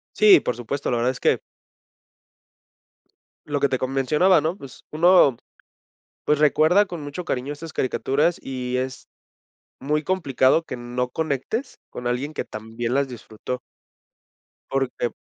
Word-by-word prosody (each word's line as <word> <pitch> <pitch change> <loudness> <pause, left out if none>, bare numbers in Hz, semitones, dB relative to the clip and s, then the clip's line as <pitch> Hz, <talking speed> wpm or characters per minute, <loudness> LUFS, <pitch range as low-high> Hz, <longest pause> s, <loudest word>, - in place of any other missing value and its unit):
Sí, 415 -4 +7
por 125 - -2
supuesto, 125 +4 -3
la 120 - +1
verdad 120 +2 +1
es 130 - -9
que - - +2 2.1
lo 145 -1 -2
que 140 - +3
te 130 - 0
co 130 - -2
mencionaba, 150 +7 +3
¿no?, 160 +5 -2
pues 135 -8 -13
uno, 165 -4 +5 0.9
pues, 150 - +2
recuerda 155 +7 +4
con 175 -4 -7
mucho 145 +5 -6
cariño 130 0 -2
estas 160 +2 -9
caricaturas 140 +5 0
y 125 -1 -4
es 130 0 -4 0.7
muy 150 +3 0
complicado 150 -4 +2
que 145 - -7
no 125 +1 -3
conectes 160 - -3
con 125 - -7
alguien 125 +5 -1
que - - -4
también 115 +3 -5
las 140 0 +1
disfrutó. 125 +1 -7 1.1
Porque 135 -3 -1
135 Hz, 140 wpm, -23 LUFS, 125-155 Hz, 2.1 s, Sí